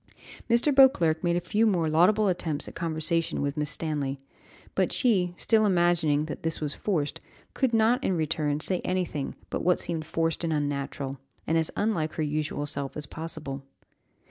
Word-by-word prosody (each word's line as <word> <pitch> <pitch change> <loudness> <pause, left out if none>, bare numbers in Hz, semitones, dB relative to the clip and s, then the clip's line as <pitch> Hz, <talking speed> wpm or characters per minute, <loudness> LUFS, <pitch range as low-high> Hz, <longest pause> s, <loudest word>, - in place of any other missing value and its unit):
Mr. 235 +5 +4
Beauclerc 175 -13 +5
made 175 -1 +2
a - - +2
few 220 +5 +1
more 175 -6 +2
laudable 185 +7 +4
attempts 165 -5 -2
at - - -8
conversation 165 0 -1
with 140 0 -1
Miss 150 -1 -1
Stanley, 145 -4 -2 0.6
but - - +1
she, 190 -9 +2
still 220 -1 +3
imagining 175 -6 +2
that 155 - -6
this 165 0 -2
was 150 -2 -2
forced, 160 -8 -2 0.3
could 265 -3 +1
not 230 +4 +3
in 185 - +1
return 150 -2 0
say 180 +2 0
anything 180 -6 -2 0.2
but - - -2
what 180 +1 +3
seemed 160 -2 -3
forced 165 0 -1
and 165 - 0
unnatural, 140 -2 -2 0.3
and 160 - 0
as 160 -1 +2
unlike 170 -8 0
her 160 - -2
usual 150 -1 -2
self 140 -1 -4
as 150 - -2
possible. 155 -3 -5
165 Hz, 170 wpm, -27 LUFS, 150-185 Hz, 0.6 s, Beauclerc